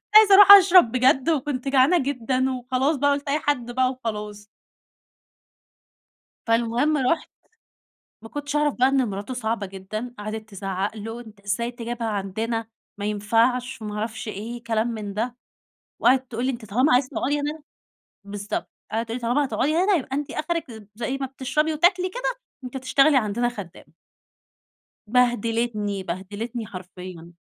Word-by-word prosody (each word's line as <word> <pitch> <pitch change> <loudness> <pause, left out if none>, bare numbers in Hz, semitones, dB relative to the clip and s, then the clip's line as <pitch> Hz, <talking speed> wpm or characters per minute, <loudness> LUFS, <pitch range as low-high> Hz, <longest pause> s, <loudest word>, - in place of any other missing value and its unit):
عايزة 420 -2 +9
أرُوح 400 0 +9
أشرب 370 - +8
بجد، 265 +4 +3
وكنت 275 -3 -1
جعانة 270 +6 +4
جدًا 260 -1 0
وخلاص 255 +4 0
بقى 285 +1 +2
قلت 280 0 -2
أي 300 +2 +1
حد 245 -5 -1
بقى 255 +1 +1
وخلاص. 210 -4 -6 2.0
فالمهم 235 +6 +2
رُحت 265 +5 0 0.9
ما 225 - -11
كنتش 290 0 -5
أعرف 295 -1 +2
بقى 255 +1 +3
إن 270 -3 +2
مراته 200 +6 -5
صعبة 225 -3 -2
جدًا، 205 +6 -6
قعدت 215 +1 -6
تزعق 195 +1 -3
له: 225 +3 -6
"أنت 220 -4 -13
إزاي 205 +5 -2
تجيبها 235 -1 -4
عندنا؟ 220 +3 -2 0.3
ما 205 - -4
ينفعش،" 230 +4 +1
وما 210 -1 -5
أعرفش 220 0 -4
إيه 230 +3 -6
كلام 225 0 0
من 210 -4 -5
ده، 235 +4 -2 0.6
وقعدت 255 0 +3
تقول 240 +3 -2
لي 265 - +1
أنتِ 235 -3 -8
طالما 250 +7 +2
عايزة 255 +1 +3
تقعدي 290 +2 -1
هنا 300 +2 -4 0.6
بالضبط. 205 +1 -5 0.2
قعدت 225 +1 -1
تقول 230 +2 -3
لي: - - -10
"طالما 265 +5 +2
هتقعدي 295 +4 0
هنا 380 +4 +3
يبقى 275 - -3
أنتِ 290 0 -3
آخرِك، 300 - -4
زي 240 +4 -3
ما 270 - -3
بتشربي 275 +4 -1
وتاكلي 360 +4 +3
كده - - -3 0.3
أنتِ 250 +1 -8
هتشتغلي 275 +2 +3
عندنا 235 +1 0
خدامة." 205 -8 -10 1.2
بهدلتني، 230 -4 0
بهدلتني 210 +6 -5
حرفيًا. 180 -3 -10
240 Hz, 150 wpm, -24 LUFS, 215-275 Hz, 2.0 s, عايزة